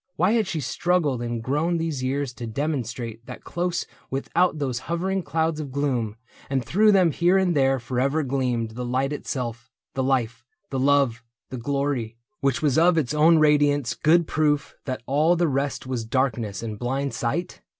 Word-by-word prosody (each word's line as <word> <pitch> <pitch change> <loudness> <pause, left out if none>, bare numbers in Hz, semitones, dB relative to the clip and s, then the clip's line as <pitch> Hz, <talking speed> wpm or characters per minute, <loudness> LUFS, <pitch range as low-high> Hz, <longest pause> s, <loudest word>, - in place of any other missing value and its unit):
Why 180 +4 +2
had 225 -3 +2
she 165 -4 -2
Struggled 150 -2 0
and 120 -1 -3
grown 150 +7 0
these 160 -5 -2
years 135 0 -1
to 120 -1 -6
demonstrate 120 -3 -3
That 125 - -9
close 175 0 -2 0.2
without 160 +5 +1
those 130 -4 -2
hovering 190 +3 0
clouds 160 0 -1
of 145 -3 -5
gloom 130 -6 -1 0.3
And 135 -3 -1
through 210 - +4
them 185 -4 +4
here 175 +5 +3
and 185 -3 +2
there 135 -1 +3
forever 130 +5 0
gleamed 125 -4 -1
The 125 +3 -5
Light 130 +3 0
itself, 120 -5 -4 0.2
the 135 - -1
life, 120 -3 0 0.3
the 135 - -1
love, 135 -4 +2 0.3
the 130 - -4
glory, 135 -3 -2 0.2
Which 140 -2 0
was 145 0 +3
of 170 +1 +4
its 145 -3 0
own 160 +2 +5
radiance 145 -4 +3
good 170 +2 +3
proof 150 -2 0
That 130 -2 -4
all 150 +6 +3
the 175 0 +2
rest 140 -1 -1
was 130 -3 -3
darkness 115 -5 -1
and 110 -2 -5
blind 135 +3 -2
sight 145 +10 -3
140 Hz, 175 wpm, -24 LUFS, 125-160 Hz, 0.3 s, own